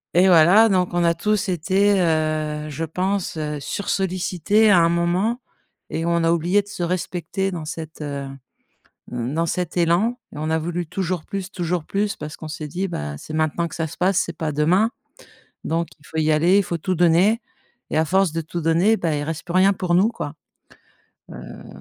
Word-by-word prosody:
Et 180 +2 +6
voilà, 185 +6 +6
donc 185 -3 +2
on 175 - +2
a 170 0 +3
tous 205 +3 0
été, 190 +4 +2
heu, 155 -2 0
je 155 +2 -5
pense, 185 +3 -2
heu, 150 -1 -3
sursollicités 190 +4 +1
à 185 - +6
un 165 0 +4
moment 175 +7 +1 0.5
et 165 - -2
on 170 0 +1
a 165 - +3
oublié 175 +5 +2
de - - -22
se 200 - -7
respecter 180 +2 -2
dans 170 -3 -5
cette, 160 -1 -7
heu, 140 -2 -4 0.9
mmh, 125 +1 -3
dans 165 +2 0
cet 180 +1 -2
élan 175 +9 +2
et - - -10
on 155 +1 -2
a 160 - +2
voulu 170 +2 -3
toujours 180 -1 -3
plus, 195 -1 -5
toujours 175 -4 -2
plus 200 +1 -1
parce 150 0 -7
qu'on 160 - -8
s'est 155 -1 -6
dit: 185 +6 -3
«Bah, 75 - -5
c'est 155 - -9
maintenant 155 +2 0
que - - -10
ça 160 - -2
se 150 - -10
passe 185 +1 +2
c'est 170 - -2
pas 160 -2 -2
demain. 175 +10 +3 0.7
Donc 165 +1 -1
il 150 - -22
faut 160 - -7
y 155 0 +2
aller, 170 +6 +4
il 200 - +4
faut 170 -2 -3
tout 185 +3 -2
donner» 175 +7 +3 0.5
et - - -1
à 160 - +4
force 190 +1 +2
de 165 - -1
tout 165 +2 -5
donner, 170 +7 +3
bah, 165 -5 -1
il 145 - -2
reste 160 +1 -5
plus 175 - -6
rien 190 +2 +5
pour 180 -2 0
nous, 195 +5 +4
quoi, 235 - -6 1.0
heu - - -10
170 Hz, 205 wpm, -22 LUFS, 160-190 Hz, 1.0 s, Et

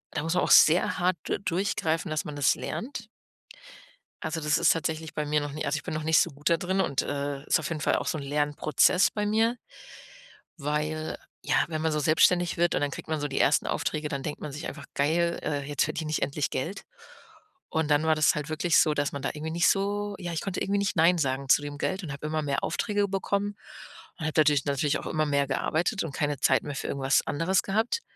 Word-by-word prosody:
da 150 - 0
muss 165 +2 -1
man 180 - +2
auch - - 0
sehr 165 +3 +6
hart 180 0 +1
du - - -2
durchgreifen, 170 -3 -1
dass 155 - -1
man 150 - -6
das 145 -1 +3
lernt. 230 -3 -6 1.2
Also, 160 +1 -2
das 150 +1 +2
ist - - +4
tatsächlich 160 0 -2
bei 150 - -2
mir 150 0 +1
noch 145 0 -4
nie 155 +2 -4
also, 150 - 0
ich 145 - -7
bin - - -5
noch 155 0 -3
nicht 160 +1 +4
so - - +2
gut 145 +1 -2
da 170 - +4
drin 190 +3 0
und, 140 -7 0
äh, 140 -1 -3
ist - - +2
auf 155 - -4
jeden 160 -3 -4
Fall - - +2
auch - - -4
so - - -1
'n - - -5
Lernprozess 150 +5 +2
bei 210 -1 -2
mir. 225 +3 +2 1.0
Weil, 150 +2 -2 0.3
ja, - - +1
wenn 155 -2 -3
man 160 0 +1
so 150 - 0
selbstständig 170 +3 +3
wird 175 0 +2
und - - 0
dann 145 -1 0
kriegt - - -8
man 155 -1 -1
so 145 - -2
die 140 - -3
1. - - +3
Aufträge, 155 0 -2
dann 140 -2 -4
denkt 150 - -5
man 150 - -6
sich 150 - -5
einfach: 145 -1 -8
„Geil, 170 +4 +1
äh, 145 -2 -1
jetzt 145 -2 +1
verdiene 155 0 -3
ich 155 - -1
endlich 145 +1 -1
Geld.“ 175 +10 -4 0.8
Und 160 -2 -1
dann 145 +1 +4
war 160 0 +3
das 155 -1 +4
halt 150 +1 -4
wirklich 160 +2 +2
so, 155 - +3
dass 145 -1 -1
man 140 - -5
da 135 - -1
irgendwie 155 +1 -5
nicht 170 +1 +2
so 205 +1 0
ja, 175 -2 -5
ich 160 - -2
konnte 195 - -4
irgendwie 200 +1 0
nicht 200 -2 -1
nein 170 +2 +4
sagen 135 -2 -1
zu 145 - +6
dem 145 0 -6
Geld 190 +6 -2
und 155 - -5
habe 140 +2 -8
immer 155 0 -1
mehr 140 -2 -2
Aufträge 205 +3 0
bekommen 200 +1 -1 0.6
und 165 - -5
habe 155 - -1
natürlich 150 -3 +4
natürlich 140 +1 0
auch - - -9
immer 155 0 0
mehr 140 -1 +2
gearbeitet 160 +7 0
und 160 -4 -6
keine 145 -2 -1
Zeit 130 - +3
mehr 145 -1 -5
für - - -4
irgendwas 135 0 +1
anderes 175 +5 +1
gehabt. 220 - 0
155 Hz, 240 wpm, -27 LUFS, 145-175 Hz, 1.2 s, sehr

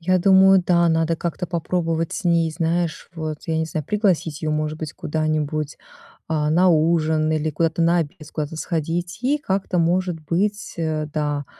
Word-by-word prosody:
Я 185 +2 +2
думаю, 190 0 +6
да, 170 -1 +4
надо 165 0 +1
как-то 175 +2 -3
попробовать 165 -1 -1
с 210 - -5
ней, 170 -2 +2
знаешь, 165 0 -2
вот, 155 -2 -4
я 160 -1 0
не 160 - +1
знаю, 155 -1 -4
пригласить 185 -8 0
её, 155 - -1
может 155 0 -2
быть, 155 -2 -5
куда-нибудь, 155 -1 -2 0.5
а, 150 -1 0
на 180 +4 +4
ужин 160 -1 +2
или 155 0 0
куда-то 165 +2 0
на 170 +1 +3
обед, 150 -3 -2
с 150 - -12
куда-то 155 0 -4
сходить 170 +3 -3
и 285 +4 +2
как-то, 195 -8 -1
может 175 0 +1
быть, 195 +7 -2
э, 155 -2 -1
да, 145 -2 -1
165 Hz, 175 wpm, -22 LUFS, 155-175 Hz, 0.5 s, думаю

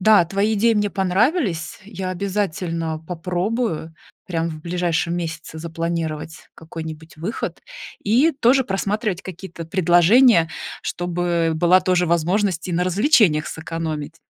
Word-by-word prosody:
Да, 215 0 +6
твои 200 +5 0
идеи 225 +2 +3
мне 205 -1 +1
понравились, 195 - 0
я 190 -2 -5
обязательно 175 -4 -2
попробую 175 +1 -3 0.3
прям 165 -2 -1
в 155 -1 -8
ближайшем 170 0 -1
месяце 160 -2 -5
запланировать 165 -1 -4
какой-нибудь 160 -1 -9
выход 175 +8 -4 0.4
и 255 +11 +4
тоже 265 0 +3
просматривать 200 -1 -2
какие-то 180 -2 -8
предложения, 175 +3 +5 0.3
чтобы 175 -1 -1
была 175 +3 +4
тоже 180 -1 +2
возможность 175 +2 0
и - - -2
на 175 +1 +1
развлечениях 185 - +3
сэкономить. 160 -1 -5
175 Hz, 120 wpm, -21 LUFS, 165-200 Hz, 0.4 s, Да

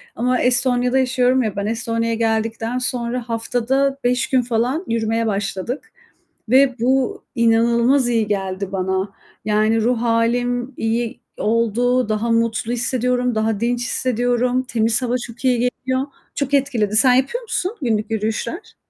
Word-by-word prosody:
ama 250 +1 +1
Estonya'da 250 +1 +2
yaşıyorum 255 0 +2
ya 215 -4 -3
ben, 200 - -2
Estonya'ya 230 +1 -1
geldikten 225 +1 -1
sonra 245 -1 -3
haftada 250 +4 0
5 250 +1 +1
gün 260 -1 +3
falan 245 +7 -1
yürümeye 225 0 0
başladık. 205 - -3 0.6
Ve 260 +2 +4
bu 260 +1 +1
inanılmaz 235 +3 +3
iyi 225 -3 +1
geldi 195 -1 -3
bana, 190 +1 -1 0.3
yani 215 +1 +2
ruh 235 +1 +1
hâlim 245 +2 0
iyi 225 +1 -2 0.2
oldu, 230 +2 +1
daha 215 +2 -1
mutlu 230 0 0
hissediyorum, 250 0 0
daha 220 -1 0
dinç 240 +1 0
hissediyorum, 245 +1 0
temiz 230 -1 +1
hava 245 -1 -1
çok 235 +2 -13
iyi 250 -2 +3
geliyor, 260 +2 -1 0.3
çok 280 0 -2
etkiledi. 230 -7 +1
Sen 250 +2 +6
yapıyor 270 - 0
musun 410 -4 -2
günlük 220 -3 -1
yürüyüşler? 220 - -3
235 Hz, 135 wpm, -20 LUFS, 225-250 Hz, 0.6 s, Sen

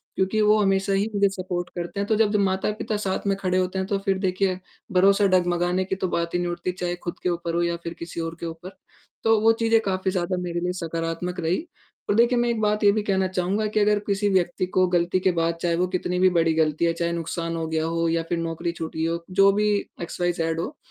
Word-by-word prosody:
क्योंकि 190 +3 0
वो 210 +1 +5
हमेशा 195 0 +1
ही 200 +3 +1
मुझे 200 0 +4
सपोर्ट 180 -2 -4
करते 175 +3 -4
हैं, 200 - -1
तो 220 - +2
जब 215 -1 +2
माता-पिता 205 +2 0
साथ 200 -1 -2
में 195 - +2
खड़े 185 -2 0
होते 185 +1 0
हैं 190 - -2
तो 200 - 0
फिर 195 -1 +2
देखिए 185 -1 0 0.3
भरोसा 195 +2 +4
डगमगाने 180 0 +1
की 190 - -2
तो 190 - -2
बात 170 -1 -2
ही 175 - +1
नहीं 175 0 -1
उठती, 175 +1 -3
चाहे 175 -1 -3
खुद 175 0 -7
के 180 - +1
ऊपर 170 -1 -2
हो 170 - +2
या 170 0 0
फिर 170 - -4
किसी 170 0 -6
और 165 0 -4
के - - -5
ऊपर। 165 +3 -7 0.5
तो 225 -1 +4
वो 225 +1 +6
चीज़ें 225 0 +4
काफ़ी 190 -1 0
ज़्यादा 185 0 -1
मेरे 175 -1 -3
लिए 180 +1 -1
सकारात्मक 165 +1 -3
रहीं, 170 - 0 0.5
और 205 - +3
देखिए 240 +2 +4
मैं 240 0 +1
एक 235 -2 -1
बात 210 0 +1
ये 205 - +7
भी 215 +1 0
कहना 190 -2 +1
चहूँगा 185 +3 -1
कि 215 0 0
अगर 210 0 +3
किसी 200 +1 +1
व्यक्ति 185 -1 +1
को 185 0 +2
गलती 175 +1 +1
के 185 0 +2
बाद, 165 -1 0
चाहे 170 -1 +1
वो 180 +2 +1
कितनी 180 0 -2
भी 185 0 +5
बड़ी 165 -2 +2
गलती 160 0 +1
है, 165 - +2
चाहे 170 0 -1
नुकसान 165 0 -3
हो 165 -1 -3
गया 160 0 -1
हो 165 0 0
या 165 0 0
फिर 175 - 0
नौकरी 165 +1 -2
छूटी 160 -1 -4
हो, 170 +1 -2
जो 195 +1 +5
भी 210 +1 +1 0.3
एक्सवाईज़ेड 170 -1 -1
हो, 270 - -4
180 Hz, 245 wpm, -24 LUFS, 170-195 Hz, 0.5 s, ये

